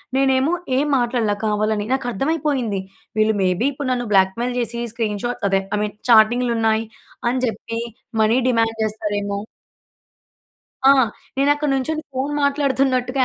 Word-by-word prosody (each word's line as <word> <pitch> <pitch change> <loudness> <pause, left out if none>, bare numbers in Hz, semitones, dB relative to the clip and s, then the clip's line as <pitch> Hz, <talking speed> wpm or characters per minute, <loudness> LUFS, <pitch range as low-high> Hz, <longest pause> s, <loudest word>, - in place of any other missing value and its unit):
నేనేమో 265 +2 +3 0.3
ఏం 280 - +2
మాట్లాడల 240 -3 +1
కావాలని. 210 0 0
నాకర్థమైపోయింది. 265 -2 -1 0.4
వీళ్ళు 215 0 +3
మేబీ 185 +5 +1
ఇప్పుడు 275 -1 -4
నన్ను 245 -1 -1
బ్లాక్‌మెయిల్ 195 +6 +2
చేసి 235 0 -3
స్క్రీన్‌షాట్స్ 225 0 -2
అదే 195 0 +2
ఐ - - 0
మీన్ 210 -1 -4
చాటింగ్‌లున్నాయి 225 -1 +4 0.4
అని 255 +1 -1
చెప్పి, 230 0 -4 0.4
మనీ 220 +3 +3
డిమాండ్ 225 -2 +1
చేస్తారేమో 205 -2 -2 1.5
ఆ! - - +9 0.5
నేనక్కడ 290 +2 +2
నుంచొని 310 +4 -2
ఫోన్ 265 +3 -2
మాట్లాడుతున్నట్టుగా 270 -2 +1
240 Hz, 120 wpm, -21 LUFS, 215-265 Hz, 1.5 s, ఆ